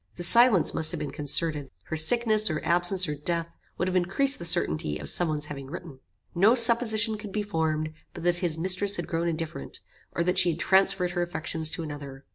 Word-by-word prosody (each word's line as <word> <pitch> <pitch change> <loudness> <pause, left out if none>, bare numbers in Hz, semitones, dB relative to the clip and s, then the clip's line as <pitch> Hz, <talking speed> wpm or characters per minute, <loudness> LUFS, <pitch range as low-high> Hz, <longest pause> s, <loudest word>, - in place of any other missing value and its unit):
The - - -6
silence 230 -2 +5
must 160 -1 +2
have 170 - -5
been 150 - -5
concerted. 150 -1 -2
Her - - -6
sickness, 215 +6 +4
or 155 -1 -2
absence, 175 +2 +2
or 150 - -3
death, 170 +3 -3 0.2
would 180 - -2
have 185 - -3
increased 195 +11 +1
the 170 - -6
certainty 75 - +1
of - - -4
some 175 - +3
one's 150 -1 -3
having 140 -2 -9
written. 155 -2 -10 0.3
No 205 +7 +4
supposition 230 -2 +2
could 210 -2 -9
be 210 +1 -3
formed 155 -4 -2 0.2
but - - -8
that 175 0 +1
his 175 -3 -2
mistress 190 +4 +1
had - - -4
grown 170 0 -3
indifferent, 160 - -5 0.3
or 170 - -1
that 180 +1 0
she 175 - +4
had 165 0 -3
transferred 190 -1 +2
her 175 -1 -3
affections 165 -2 -2
to 165 - -4
another. 140 -3 -9
170 Hz, 210 wpm, -26 LUFS, 155-195 Hz, 0.3 s, silence